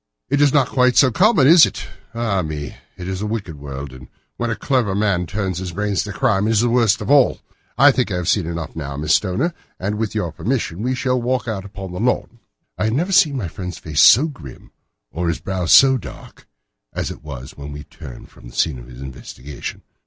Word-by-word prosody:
"That 140 Hz, +2 st, +1 dB
is 145 Hz, -2 st, +5 dB
not 135 Hz, -3 st, +2 dB
quite 125 Hz, -1 st, +2 dB
so 130 Hz, -3 st, +6 dB
common, 185 Hz, -, +4 dB
is 165 Hz, +3 st, +8 dB
it? -, -, -7 dB, 0.3 s
Ah, 110 Hz, -5 st, 0 dB
me! 75 Hz, -3 st, -5 dB, 0.2 s
it's 95 Hz, +1 st, -5 dB
a 105 Hz, -, -2 dB
wicked 100 Hz, -9 st, -5 dB
world, 70 Hz, -1 st, -7 dB
and 65 Hz, 0 st, -12 dB, 0.3 s
when 120 Hz, -, -2 dB
a 115 Hz, -, -1 dB
clever 120 Hz, -8 st, 0 dB
man 100 Hz, -4 st, 0 dB
turns 95 Hz, -1 st, -3 dB
his 90 Hz, -2 st, -5 dB
brains 100 Hz, +1 st, -1 dB
to 105 Hz, -, -6 dB
crime 105 Hz, -2 st, +1 dB
it -, -, +1 dB
is 110 Hz, -, +3 dB
the 120 Hz, -, +2 dB
worst 115 Hz, -2 st, +2 dB
of 105 Hz, -, -2 dB
all. 140 Hz, -3 st, +4 dB, 0.4 s
I 145 Hz, +2 st, +7 dB
think 125 Hz, -1 st, 0 dB
that 95 Hz, -, -3 dB
I -, -, -1 dB
have 90 Hz, -1 st, -3 dB
seen 90 Hz, -3 st, +1 dB
enough 85 Hz, -2 st, -5 dB
now, 70 Hz, -3 st, -5 dB
Miss 75 Hz, +2 st, +1 dB
Stoner, 115 Hz, -, +1 dB, 0.3 s
and 105 Hz, +3 st, -3 dB
with 110 Hz, -1 st, -2 dB
your 90 Hz, -6 st, -1 dB
permission 105 Hz, -, -3 dB
we 125 Hz, +3 st, -1 dB
shall 125 Hz, 0 st, 0 dB
walk 125 Hz, +1 st, -1 dB
out 100 Hz, -4 st, -4 dB
upon 95 Hz, -2 st, -8 dB
the 90 Hz, -, -6 dB
lawn." -, -, -1 dB, 0.4 s
I -, -, +1 dB
had 110 Hz, -, 0 dB
never 170 Hz, +9 st, 0 dB
seen 150 Hz, -6 st, +4 dB
my 105 Hz, -8 st, -3 dB
friend's 90 Hz, 0 st, -7 dB
face 75 Hz, -2 st, 0 dB
so 130 Hz, -, +7 dB
grim 80 Hz, -, -10 dB, 0.4 s
or 85 Hz, +1 st, -3 dB
his 85 Hz, -, -1 dB
brow 95 Hz, -2 st, -3 dB
so 135 Hz, +4 st, +6 dB
dark -, -, -12 dB, 0.5 s
as -, -, -3 dB
it -, -, -11 dB
was 70 Hz, -4 st, -9 dB
when 70 Hz, 0 st, -8 dB
we 75 Hz, 0 st, -8 dB
turned 75 Hz, -7 st, -12 dB
from -, -, -15 dB
the -, -, -14 dB
scene 70 Hz, -6 st, 0 dB
of -, -, -12 dB
this 60 Hz, +1 st, -11 dB
investigation. 65 Hz, +1 st, -8 dB
100 Hz, 230 wpm, -20 LUFS, 80-125 Hz, 0.5 s, is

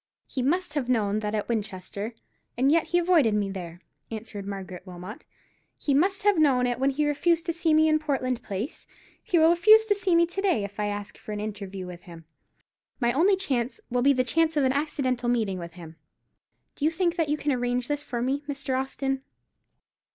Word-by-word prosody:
"He 260 Hz, -, -4 dB
must 325 Hz, +5 st, 0 dB
have 275 Hz, -5 st, -2 dB
known 215 Hz, -4 st, +1 dB
that 210 Hz, 0 st, -2 dB
at 210 Hz, -, -2 dB
Winchester, 210 Hz, 0 st, -4 dB, 0.4 s
and 265 Hz, +3 st, +3 dB
yet 325 Hz, 0 st, +3 dB
he 350 Hz, -, +1 dB
avoided 335 Hz, -11 st, +3 dB
me 200 Hz, -2 st, 0 dB
there," 175 Hz, -2 st, -7 dB, 0.3 s
answered 215 Hz, -3 st, -6 dB
Margaret 190 Hz, -3 st, -6 dB
Wilmot; 185 Hz, -, -9 dB, 0.5 s
"he 285 Hz, -, 0 dB
must 380 Hz, +8 st, +2 dB
have 405 Hz, -4 st, +4 dB
known 265 Hz, -5 st, +4 dB
it 245 Hz, 0 st, -1 dB
when 270 Hz, +1 st, +3 dB
he 295 Hz, +2 st, 0 dB
refused 330 Hz, +3 st, +1 dB
to 335 Hz, -, -1 dB
see 330 Hz, -1 st, 0 dB
me 310 Hz, +1 st, +5 dB
in 310 Hz, 0 st, +3 dB
Portland 260 Hz, -5 st, -1 dB
Place. 210 Hz, -, -5 dB, 0.3 s
He 350 Hz, -, 0 dB
will 325 Hz, +1 st, +6 dB
refuse 430 Hz, +6 st, +6 dB
to 425 Hz, -, +3 dB
see 390 Hz, -3 st, +1 dB
me 340 Hz, 0 st, +5 dB
to 355 Hz, +3 st, -4 dB
day, 360 Hz, -, +2 dB
if 200 Hz, +1 st, -7 dB
I 210 Hz, -, 0 dB
ask 205 Hz, 0 st, -5 dB
for 215 Hz, -, -7 dB
an 210 Hz, -, -4 dB
interview 200 Hz, -3 st, -5 dB
with 180 Hz, -1 st, -9 dB
him. 165 Hz, -3 st, -12 dB, 0.7 s
My 240 Hz, -2 st, +2 dB
only 370 Hz, +8 st, +4 dB
chance 260 Hz, -10 st, -2 dB
will 245 Hz, 0 st, +1 dB
be 280 Hz, +3 st, +5 dB
the 255 Hz, -2 st, +2 dB
chance 320 Hz, +5 st, +1 dB
of 290 Hz, -, +3 dB
an 260 Hz, 0 st, +2 dB
accidental 260 Hz, -4 st, -1 dB
meeting 215 Hz, -6 st, 0 dB
with 170 Hz, 0 st, -8 dB
him. 165 Hz, -2 st, -11 dB, 0.8 s
Do -, -, -7 dB
you 310 Hz, -, +5 dB
think 340 Hz, +1 st, 0 dB
that 330 Hz, -4 st, 0 dB
you 300 Hz, -, +1 dB
can 295 Hz, -1 st, -1 dB
arrange 245 Hz, -1 st, -1 dB
this 290 Hz, 0 st, -2 dB
for 240 Hz, -3 st, -3 dB
me, 270 Hz, +3 st, 0 dB
Mr. 275 Hz, -2 st, -2 dB
Austin?" 270 Hz, 0 st, -3 dB
260 Hz, 210 wpm, -26 LUFS, 210-315 Hz, 0.8 s, will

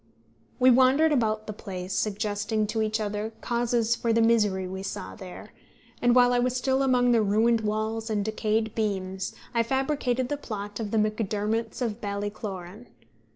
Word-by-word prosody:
We 255 Hz, +1 st, +6 dB
wandered 265 Hz, +5 st, +5 dB
about 220 Hz, -6 st, +1 dB
the 215 Hz, -, -5 dB
place, 185 Hz, -2 st, -6 dB
suggesting 210 Hz, +1 st, -1 dB
to 220 Hz, +1 st, -2 dB
each 215 Hz, 0 st, 0 dB
other 210 Hz, +1 st, -3 dB
causes 235 Hz, -1 st, +1 dB
for 230 Hz, 0 st, -1 dB
the 225 Hz, -, +3 dB
misery 210 Hz, -5 st, +2 dB
we 190 Hz, +1 st, -5 dB
saw 195 Hz, -, -5 dB
there, 185 Hz, -4 st, -10 dB, 0.5 s
and 240 Hz, 0 st, +4 dB
while 245 Hz, 0 st, +6 dB
I 245 Hz, -, +3 dB
was 250 Hz, 0 st, +1 dB
still 265 Hz, +1 st, +1 dB
among 250 Hz, -2 st, +3 dB
the 230 Hz, -2 st, +4 dB
ruined 220 Hz, +3 st, +3 dB
walls 220 Hz, +1 st, -2 dB
and 205 Hz, -2 st, 0 dB
decayed 220 Hz, 0 st, -1 dB
beams 190 Hz, -3 st, -2 dB, 0.2 s
I 235 Hz, -, +3 dB
fabricated 260 Hz, 0 st, 0 dB
the 290 Hz, -, -2 dB
plot 205 Hz, -5 st, -6 dB
of 220 Hz, -2 st, -3 dB
The 225 Hz, -, 0 dB
Macdermots 215 Hz, +2 st, -1 dB
of 225 Hz, -1 st, -3 dB
Ballycloran. 205 Hz, 0 st, -5 dB
220 Hz, 165 wpm, -27 LUFS, 205-240 Hz, 0.5 s, We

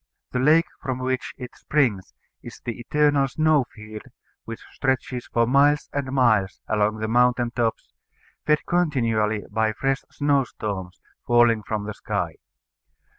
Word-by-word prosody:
The 125 Hz, -, -1 dB
lake 155 Hz, +5 st, +5 dB, 0.2 s
from 130 Hz, -2 st, -3 dB
which 130 Hz, 0 st, -3 dB
it 125 Hz, -2 st, -9 dB
springs 120 Hz, -11 st, 0 dB, 0.3 s
is -, -, -11 dB
the 120 Hz, 0 st, -4 dB
eternal 145 Hz, +2 st, +2 dB
snow 155 Hz, 0 st, +2 dB
field 110 Hz, 0 st, -10 dB, 0.4 s
which 115 Hz, 0 st, -8 dB
stretches 130 Hz, -1 st, -2 dB
for 115 Hz, 0 st, +3 dB
miles 140 Hz, +4 st, +3 dB
and 140 Hz, -2 st, -2 dB
miles 110 Hz, -8 st, +2 dB
along 105 Hz, 0 st, +1 dB
the 110 Hz, 0 st, -3 dB
mountain 120 Hz, +1 st, +2 dB
tops, 115 Hz, -2 st, -2 dB, 0.5 s
fed 150 Hz, 0 st, +1 dB
continually 115 Hz, -11 st, +1 dB
by 110 Hz, 0 st, +1 dB
fresh 135 Hz, +3 st, -1 dB
snow 145 Hz, -1 st, +1 dB
storms 95 Hz, -6 st, -6 dB, 0.3 s
falling 120 Hz, -2 st, +4 dB
from 105 Hz, 0 st, -3 dB
the 105 Hz, -, -5 dB
sky. -, -, -3 dB
125 Hz, 140 wpm, -24 LUFS, 110-140 Hz, 0.5 s, lake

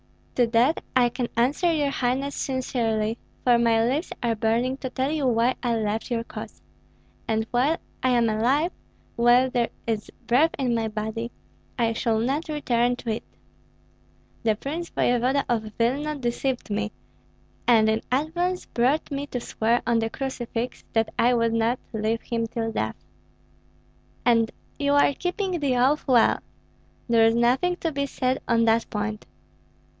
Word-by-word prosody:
"To 245 Hz, -2 st, +3 dB
that 240 Hz, +7 st, +2 dB
I 245 Hz, -1 st, +5 dB
can 245 Hz, 0 st, -3 dB
answer 285 Hz, +9 st, +2 dB
your 295 Hz, -3 st, +1 dB
highness 270 Hz, +2 st, -1 dB
sincerely, 230 Hz, -4 st, -1 dB, 0.2 s
for 240 Hz, -2 st, +5 dB
my 230 Hz, -1 st, +3 dB
lips 280 Hz, +8 st, -1 dB
are 235 Hz, -1 st, +2 dB
burning 230 Hz, +4 st, 0 dB
to 260 Hz, -, -5 dB
tell 265 Hz, +2 st, -1 dB
you 300 Hz, -4 st, 0 dB
why 240 Hz, +1 st, +3 dB
I 240 Hz, -2 st, 0 dB
left 220 Hz, +1 st, -2 dB
your 235 Hz, -2 st, -1 dB
cause; -, -, -9 dB, 0.6 s
and 220 Hz, 0 st, 0 dB
while 270 Hz, +7 st, +2 dB, 0.2 s
I 255 Hz, -, +2 dB
am 240 Hz, -2 st, +3 dB
alive, 255 Hz, +10 st, +2 dB, 0.4 s
while 245 Hz, +2 st, +4 dB
there 240 Hz, -2 st, +1 dB, 0.2 s
is 220 Hz, -2 st, -2 dB, 0.2 s
breath 290 Hz, +7 st, +3 dB
in 255 Hz, -3 st, 0 dB
my 225 Hz, -1 st, 0 dB
body, 220 Hz, +2 st, -4 dB, 0.5 s
I 230 Hz, -2 st, +1 dB
shall 225 Hz, 0 st, 0 dB
not 275 Hz, +8 st, -1 dB
return 245 Hz, -5 st, +1 dB
to 235 Hz, -2 st, -4 dB
it. 220 Hz, -, -3 dB, 1.2 s
The 220 Hz, -2 st, +2 dB
prince 315 Hz, +9 st, -5 dB
voevoda 250 Hz, +3 st, +1 dB
of 220 Hz, -3 st, -1 dB
Vilna 280 Hz, +6 st, 0 dB
deceived 250 Hz, -2 st, -2 dB
me, 210 Hz, +1 st, -1 dB, 0.8 s
and 225 Hz, -3 st, +5 dB
in 220 Hz, 0 st, +1 dB
advance 345 Hz, +7 st, 0 dB
brought 265 Hz, +7 st, 0 dB
me 280 Hz, +1 st, -3 dB
to 250 Hz, -, -3 dB
swear 235 Hz, 0 st, 0 dB
on 235 Hz, 0 st, +2 dB
the 225 Hz, 0 st, -1 dB
crucifix 245 Hz, -2 st, -4 dB
that 225 Hz, -1 st, +1 dB
I 245 Hz, +1 st, +4 dB
would 230 Hz, -1 st, +1 dB
not 230 Hz, +2 st, +1 dB, 0.2 s
leave 220 Hz, +1 st, -1 dB
him 230 Hz, -1 st, -2 dB
till 225 Hz, 0 st, -3 dB
death." -, -, -2 dB, 1.3 s
"And 230 Hz, -2 st, +4 dB, 0.3 s
you 285 Hz, 0 st, +2 dB
are 285 Hz, 0 st, +4 dB
keeping 360 Hz, -, -2 dB
the 275 Hz, -4 st, +1 dB
oath 275 Hz, +6 st, +2 dB
well. 245 Hz, -4 st, +4 dB, 0.7 s
There 230 Hz, -2 st, +5 dB
is 225 Hz, -, +2 dB
nothing 255 Hz, +10 st, +2 dB
to 330 Hz, -2 st, -2 dB
be 280 Hz, -1 st, -1 dB
said 255 Hz, -1 st, -1 dB
on 230 Hz, -1 st, +3 dB
that 225 Hz, 0 st, +2 dB
point." 210 Hz, 0 st, -4 dB
240 Hz, 160 wpm, -25 LUFS, 230-275 Hz, 1.3 s, I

